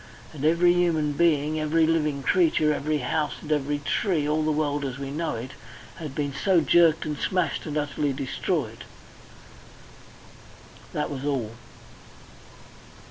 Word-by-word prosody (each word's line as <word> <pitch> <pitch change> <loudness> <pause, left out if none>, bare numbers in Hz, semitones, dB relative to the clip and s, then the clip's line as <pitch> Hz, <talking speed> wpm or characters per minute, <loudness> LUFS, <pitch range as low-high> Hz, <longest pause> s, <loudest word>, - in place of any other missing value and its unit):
And 145 -2 -8
every 170 +3 +4
human 165 -4 +1
being, 155 -1 +1
every 155 +1 +2
living 150 -4 0
creature, 155 -1 +3
every 150 +1 -1
house, 150 +3 -1
and 155 - -8
every 145 -1 0
tree 150 +1 0
all 155 +1 +1
the 155 0 +1
world 145 -1 -1
as 135 -2 -4
we 140 0 -5
know 160 0 -2
it 120 +4 -6 0.5
had 150 -5 -7
been 145 -2 -2
so 185 +5 +2
jerked 165 0 +4
and 150 -1 -2
smashed 185 -2 -1
and 150 0 -3
utterly 145 0 -1
destroyed. 135 -1 -3 2.1
That - - -2
was 135 -1 -5
all. 135 -7 -1
150 Hz, 140 wpm, -25 LUFS, 145-160 Hz, 2.1 s, every